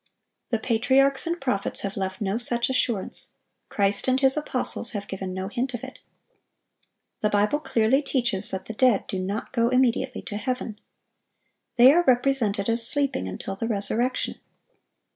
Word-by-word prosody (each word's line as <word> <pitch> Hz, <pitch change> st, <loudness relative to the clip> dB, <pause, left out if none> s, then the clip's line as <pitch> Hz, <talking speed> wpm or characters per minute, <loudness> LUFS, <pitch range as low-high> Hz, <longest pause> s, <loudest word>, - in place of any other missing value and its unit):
The 230 Hz, -, +1 dB
patriarchs 265 Hz, +6 st, +2 dB
and 340 Hz, +1 st, -2 dB
prophets 250 Hz, -9 st, 0 dB
have 200 Hz, 0 st, -4 dB
left 190 Hz, 0 st, -4 dB
no 195 Hz, 0 st, -1 dB
such 240 Hz, +1 st, +1 dB
assurance. 235 Hz, -6 st, -2 dB, 0.4 s
Christ 200 Hz, +2 st, 0 dB
and 260 Hz, 0 st, +3 dB
His 265 Hz, -1 st, +4 dB
apostles 260 Hz, -5 st, -2 dB
have 205 Hz, -2 st, -5 dB
given 190 Hz, -1 st, -5 dB
no 190 Hz, +1 st, -4 dB
hint 250 Hz, +4 st, -3 dB
of 245 Hz, -, -8 dB
it. 265 Hz, -, -9 dB, 1.2 s
The 210 Hz, -, +1 dB
Bible 210 Hz, +8 st, +1 dB
clearly 265 Hz, -1 st, +2 dB
teaches 245 Hz, -9 st, -1 dB
that 190 Hz, -1 st, -5 dB
the 225 Hz, -, -6 dB
dead 245 Hz, -2 st, +3 dB
do 190 Hz, -, -4 dB
not 200 Hz, +7 st, -4 dB
go 235 Hz, -2 st, +2 dB
immediately 255 Hz, -1 st, +1 dB
to 205 Hz, -, -5 dB
heaven. 220 Hz, -1 st, -4 dB, 1.0 s
They 250 Hz, +3 st, +8 dB
are 350 Hz, +2 st, +4 dB
represented 245 Hz, -6 st, +2 dB
as 230 Hz, 0 st, +3 dB
sleeping 280 Hz, -, 0 dB
until 195 Hz, -, -5 dB
the 225 Hz, +4 st, -3 dB
resurrection. 230 Hz, +4 st, -1 dB
235 Hz, 160 wpm, -25 LUFS, 200-260 Hz, 1.2 s, They